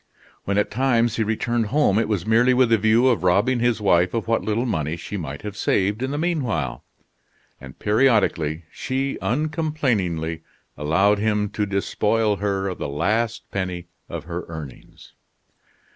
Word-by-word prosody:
When 100 0 0
at 105 - +1
times 120 0 +1
he 115 - +2
returned 115 +1 -1
home, 110 -5 +2
it 115 - 0
was 105 -4 -1
merely 120 +3 +4
with 125 -2 +3
the 115 - +6
view 110 +4 +4
of 120 -9 +2
robbing 100 +8 +3
his 120 -1 +1
wife 90 -1 +2
of 115 - -2
what 115 0 +1
little 110 +3 0
money 80 - -1
she 95 - -7
might 75 -5 -6
have 105 -1 -6
saved 100 +2 0
in 130 - -1
the 145 - -3
mean 165 0 0
while; 80 - -3 0.8
and 65 0 -12
periodically 105 - +2
she 135 +1 -3
uncomplainingly 125 - -1 0.3
allowed 95 +8 +2
him 105 -1 0
to 105 0 -2
despoil 105 +2 0
her 100 0 -1
of 95 - -5
the - - -3
last 110 +11 0
penny 90 -3 -4 0.2
of - - -5
her 85 +1 -5
earnings. 80 -4 -10
105 Hz, 165 wpm, -23 LUFS, 90-120 Hz, 0.8 s, the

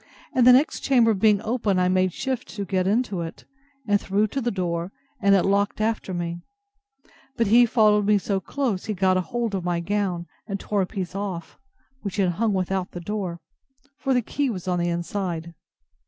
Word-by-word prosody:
and 250 -1 +4
the - - +10
next 265 +5 +4
chamber 235 -4 +4
being 210 0 +3
open, 220 -4 0
I 180 0 +3
made 185 0 +2
shift 260 +5 -3
to 200 -1 -3
get 185 0 0
into 210 -3 0
it, 165 -1 -7 0.4
and 205 -1 +3
threw 200 +2 +1
to 275 - -2
the 240 - 0
door, 175 -3 -2 0.3
and 200 -1 +5
it 190 - +3
locked 200 +1 +1
after 215 -2 -1
me; 175 -1 -3 1.0
but 230 - +2
he 235 +3 +6
followed 210 -3 +3
me 210 0 +5
so 195 0 -1
close, 225 -1 -2
he 215 - -2
got 185 0 +3
hold 230 +3 -2
of 190 -2 -2
my 175 -1 0
gown, 185 -1 -1 0.2
and 195 -2 -3
tore 205 0 -1
a 185 - -1
piece 185 -4 -5
off, 190 -4 -5 0.4
which 200 -1 -5
hung 200 +3 +1
without 190 -1 -1
the 175 - -5
door; 180 -2 -4 0.6
for 270 -2 +1
the 250 - +2
key 285 +4 -1
was 190 -6 -5
on 180 -1 +1
the 175 0 0
inside. 170 -1 -3
195 Hz, 195 wpm, -24 LUFS, 180-220 Hz, 1.0 s, the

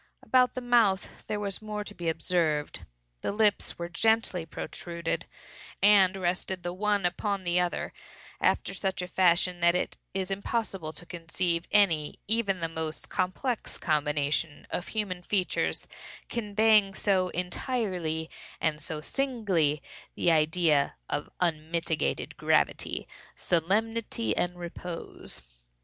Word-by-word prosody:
About 255 -1 +4
the 255 - -3
mouth 230 -6 +2
there 210 - -1
was 200 -1 -3
more 210 -1 -4
to 205 - -9
be 170 -4 -2
observed. 160 -3 0 0.3
The - - -1
lips 210 0 +2
were 170 - -3
gently 190 -2 +1
protruded, 170 +1 -4 0.5
and 195 -1 +6
rested 185 0 -1
the 175 - -3
one 205 0 +1
upon 200 +2 -1
the 175 0 +2
other, 180 -1 -1 0.5
after - - +2
such 190 -2 -1
a - - -4
fashion 180 0 +3
that 170 0 +4
it 180 - -1 0.2
is 190 0 -2
impossible 195 -4 -2
to 165 +3 -9
conceive 170 0 -1
any, 165 -8 +3
even 205 -4 +1
the 165 - +1
most 160 -1 -4
complex, 200 +6 -1
combination 150 0 0
of 175 - -2
human 200 -5 -2
features, 185 0 0 0.4
conveying 215 -2 +3
so 190 -3 +2
entirely, 180 -3 -2 0.3
and 155 -1 0
so 155 0 -3
singly, 190 - +1 0.3
the 175 - +3
idea 155 -2 +3 0.2
of - - -2
unmitigated 165 -1 -1
gravity, - - +1 0.3
solemnity 225 +7 0
and 175 0 -1
repose. 170 - -6
180 Hz, 125 wpm, -29 LUFS, 165-205 Hz, 0.5 s, and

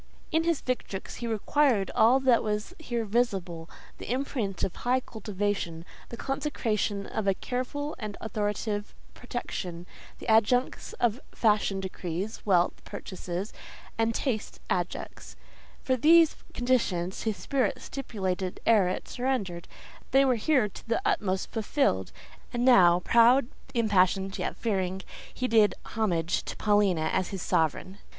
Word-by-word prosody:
In 320 0 +2
his 335 -3 +1
victrix 245 -6 -4
he 235 - -4
required 225 -1 +2
all 245 +4 +5
that 255 -3 +4
was 210 +9 -2
here 240 -7 -2
visible—the 195 -7 -3
imprint 245 -7 -2
of 190 - -2
high 250 +1 +1
cultivation, 205 -7 -3 0.2
the 235 - -7
consecration 225 -8 -1
of 220 -2 -3
a 195 - +3
careful 255 +7 -3
and 210 -3 -5
authoritative 210 -1 -3 0.2
protection, 180 -8 -5 0.3
the - - -10
adjuncts 225 +3 +2
that 240 0 +2
Fashion 210 -3 +2
decrees, 190 +1 -4
Wealth 180 -3 +2
purchases, 185 -1 -6 0.4
and 225 0 +1
Taste 235 -7 -2
adjusts; 180 -1 -3 0.5
for 260 - +2
these 325 +5 +6 0.2
conditions 210 -8 0
his 220 -3 -1
spirit 260 +7 0
stipulated 190 -8 -3
ere 215 -5 +5
it 185 - -3
surrendered: 225 -10 -2 0.4
they 270 +1 +5
were 260 - +4
here 245 0 +2
to 210 - -13
the 230 - +2
utmost 195 - 0
fulfilled; 255 +6 0 0.4
and 240 0 0
now, 180 -8 +6
proud, 235 +6 +5 0.3
impassioned, 195 -3 +2
yet - - -2
fearing, 190 -4 -1 0.3
he 255 - -2
did 220 -3 +4
homage 180 -6 0
to - - -5
Paulina 200 -6 +2
as 190 -1 +1
his 195 -3 -5
sovereign. 165 +5 0
215 Hz, 130 wpm, -28 LUFS, 190-245 Hz, 0.5 s, these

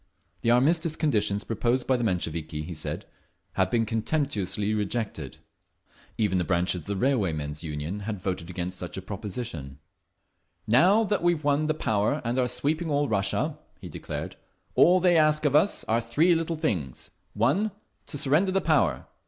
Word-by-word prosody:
The 115 - +1
armistice 155 +6 +3
conditions 105 -10 +1
proposed 120 +3 0
by 130 - +2
the 120 - -1
Mensheviki, 80 -6 -2
he 85 +3 -6
said, 75 - -5 0.5
had - - +1
been 115 -1 +1
contemptuously 110 - -1
rejected. 105 +1 -3 0.8
Even 105 -4 +1
the - - +1
branches 90 0 0
of - - -18
the 100 - -2
Railwaymen's 85 - 0
Union 80 +4 -4
had 105 0 -4
voted 90 -3 -4
against 90 0 -4
such 90 - -6
a - - -4
proposition…. 95 - -6 0.9
"Now 180 - +5
that 205 -2 0
we've 175 -3 +1
won 145 +1 +2
the 155 - +1
power 110 +2 0
and 120 +3 0
are 125 - +2
sweeping 145 +7 -1
all 145 -1 +1
Russia," 100 -2 0 0.2
he - - -9
declared, - - -6 0.4
"all 180 +2 +6
they 175 -2 +4
ask 155 0 +3
of 145 -1 +2
us 175 +7 +3
are 115 +1 +1
three 150 +10 +3
little 165 0 -1
things: 90 - -3 0.2
1. 140 - +2 0.4
To 145 - -3
surrender 155 +8 +2
the 195 - +2
power. 155 - +1
115 Hz, 165 wpm, -27 LUFS, 95-155 Hz, 0.9 s, all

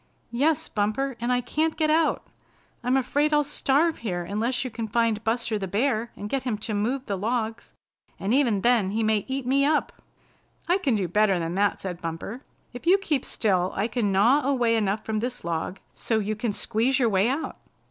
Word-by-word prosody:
"Yes, 290 +6 +1
Bumper, 225 +6 -1
and 240 +1 -1
I 250 0 +2
can't 310 +6 -1
get 310 -1 +2
out. 320 0 +2 0.6
I'm 250 +2 +2
afraid 290 +4 +1
I'll 295 - +4
starve 295 +3 +1
here 180 -6 -3
unless 230 +7 -1
you 255 - -4
can 225 0 -4
find 230 -1 +1
Buster 225 -1 -1
the 195 - -3
Bear 225 +3 0
and 205 - -6
get 270 +5 -1
him 245 -4 -2
to 215 +1 -4
move 245 +6 -1
the 200 - -2
logs. 225 +3 -3 0.5
And 200 +4 0
even 240 -8 +3
then 235 -4 +3
he 220 +3 -1
may 215 -2 +1
eat 265 -1 -3
me 275 +2 +3
up." 300 +1 0 0.7
"I 355 +3 +3
can 275 - +1
do 195 -4 0
better 200 +1 +3
than 165 0 -3
that," 200 +2 +1
said 180 -2 -6
Bumper. 165 +9 -5 0.3
"If 245 +7 -9
you 375 +3 +7
keep 310 -9 -1
still 185 -4 0
I 200 +3 0
can 235 -4 0
gnaw 230 +10 +4
away 245 -5 +2
enough 210 -1 0
from 220 -1 -1
this 245 +2 -4
log 170 +3 -3
so 225 - -1
you 215 0 -1
can 220 +1 -2
squeeze 235 +5 0
your 245 -4 +3
way 200 +2 +2
out." 280 +5 -3
230 Hz, 205 wpm, -25 LUFS, 205-270 Hz, 0.7 s, you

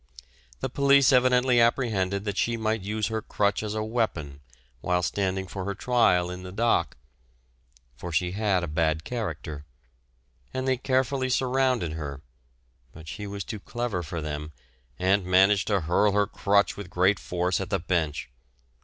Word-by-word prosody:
The - - -2
police 140 -1 +5
evidently 125 -1 +4
apprehended 105 -5 +1
that 100 -2 -2
she 115 +3 0
might 110 -1 -1
use 105 +2 -2
her 110 0 -2
crutch 100 -1 0
as 105 0 -4
a 110 - -1
weapon 105 - -2 0.4
while 90 +5 0
standing 95 +1 -1
for 95 +1 -6
her 100 0 -3
trial 90 -7 +2
in 90 0 -7
the 90 0 -8
dock, 110 -4 +1 1.0
for 90 +5 -6
she 90 +3 0
had 100 -2 0
a - - -2
bad 80 0 0
character, 95 - -5 0.9
and 130 0 -2
they 130 -1 +2
carefully 130 0 0
surrounded 130 -7 +1
her; 75 -3 -6 0.7
but 80 0 -13
she 105 +3 -6
was 100 0 -5
too 110 -2 -6
clever 120 -3 -3
for 80 0 -5
them, 75 0 -5 0.4
and 95 +2 +2
managed 95 +2 +4
to 100 -3 +1
hurl 90 +6 +2
her 105 0 +3
crutch 100 0 +1
with 100 -3 -8
great 90 +3 +2
force 90 +1 -1
at 95 - -5
the - - +1
Bench. 80 -6 -2
100 Hz, 160 wpm, -26 LUFS, 90-115 Hz, 1.0 s, police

